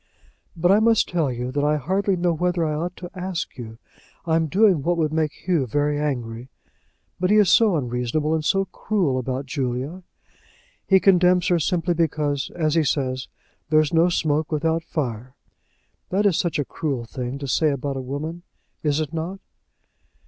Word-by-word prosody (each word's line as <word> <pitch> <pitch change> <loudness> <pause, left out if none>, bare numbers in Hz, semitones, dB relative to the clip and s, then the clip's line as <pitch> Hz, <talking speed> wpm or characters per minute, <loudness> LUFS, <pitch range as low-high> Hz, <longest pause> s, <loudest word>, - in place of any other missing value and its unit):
"But 175 +2 +2
I 200 - +6
must 225 0 +3
tell 165 -6 0
you, 125 +1 -4
that 145 +2 -1
I 150 +1 +2
hardly 190 +6 0
know 175 -1 +1
whether 175 +1 0
I 155 - -1
ought 175 +4 -3
to 175 -1 -8
ask 185 -1 -4
you. 115 -2 -9 0.5
I'm 160 -1 +1
doing 190 -1 +3
what 175 +4 0
would 155 -2 0
make 155 -2 +1
Hugh 165 -8 -1
very 145 +4 0
angry. 125 -4 -3 0.7
But 180 0 +1
he 210 - +4
is 205 -4 +5
so 220 -5 +5
unreasonable, 125 +4 -1
and 160 -1 0
so 195 +5 +2
cruel 180 -12 -1
about 130 +2 -3
Julia. 135 +5 -3 0.9
He 190 -1 +6
condemns 180 -1 +4
her 175 -1 +3
simply 175 +2 0
because, 150 -4 -1
as 155 -3 0
he 165 -1 +3
says, 130 -2 -1 0.4
there 155 0 +5
is 155 +1 0
no 165 +2 +4
smoke 155 -2 0
without 160 +2 0
fire. 130 -5 -4 0.7
That 200 +3 +1
is 195 -5 +4
such 170 -1 0
a 145 - -1
cruel 135 -7 -3
thing 125 +3 -5
to 140 0 -6
say 155 +4 +2
about 140 0 -2
a 135 - -3
woman; 150 +6 -5 0.4
is 150 -1 +1
it 155 0 -4
not?" 170 +4 -4
155 Hz, 180 wpm, -23 LUFS, 140-175 Hz, 0.9 s, I